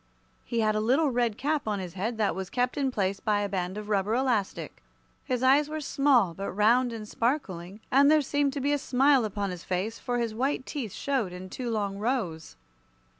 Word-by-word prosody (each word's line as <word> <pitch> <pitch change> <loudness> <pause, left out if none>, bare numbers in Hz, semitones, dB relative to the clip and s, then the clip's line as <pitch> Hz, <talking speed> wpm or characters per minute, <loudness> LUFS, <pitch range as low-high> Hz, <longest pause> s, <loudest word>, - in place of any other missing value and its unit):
He 235 -1 -1
had 215 -1 +2
a 215 - 0
little 265 +7 +2
red 235 -3 0
cap 295 -2 -1
on 210 -1 0
his 180 -3 -6
head 215 +5 -3
that 210 -5 +1
was 190 +1 -5
kept 250 0 0
in 280 -2 0
place 195 -5 -1
by 210 -1 +1
a 205 - 0
band 185 0 -3
of 210 0 -6
rubber 205 +1 +1
elastic. 245 -6 -1 0.4
His 250 0 -1
eyes 285 +3 +4
were 310 0 -3
small, 275 - +2
but 195 +4 -5
round 235 +5 +3
and 220 -2 -7
sparkling, 210 - -2
and 280 +2 +6
there 305 -1 +5
seemed 285 0 0
to 285 - -3
be 285 +2 +1
a 290 - +1
smile 265 -1 +3
upon 200 -2 -3
his 180 -2 -7
face, 190 +5 -2
for 245 0 -2
his 230 -2 -1
white 260 +3 -1
teeth 255 -9 -4
showed 260 -7 -1
in 185 +1 -9
two 250 -2 -4
long 200 -3 -2
rows. 200 - -2
230 Hz, 215 wpm, -28 LUFS, 200-265 Hz, 0.4 s, and